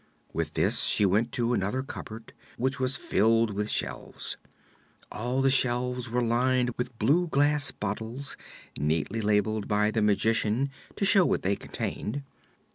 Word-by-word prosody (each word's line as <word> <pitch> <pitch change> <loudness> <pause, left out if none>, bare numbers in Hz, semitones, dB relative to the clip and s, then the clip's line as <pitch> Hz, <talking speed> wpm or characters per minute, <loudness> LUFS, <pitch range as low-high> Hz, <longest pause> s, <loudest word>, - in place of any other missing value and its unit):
With 80 -1 -3
this - - +4
she 105 - +3
went 105 +5 +1
to 120 0 0
another 120 +5 -1
cupboard 110 -4 -9 0.2
which 130 +2 -1
was 130 +1 0
filled 115 -3 +2
with 105 +2 -2
shelves. - - -3 0.8
All 125 +4 -2
the 135 - +4
shelves 125 -1 +3
were 125 +1 0
lined 125 +1 +1
with 125 -1 -5
blue 150 +12 +2
glass 145 -1 +2
bottles, 110 +6 -5 0.4
neatly 80 +8 -1
labeled 105 0 0
by 105 0 +1
the 110 - -1
Magician 110 +5 +1 0.2
to 200 - 0
show 195 -1 +7
what - - 0
they 100 +2 +1
contained. 140 +7 -5
115 Hz, 145 wpm, -27 LUFS, 105-130 Hz, 0.8 s, show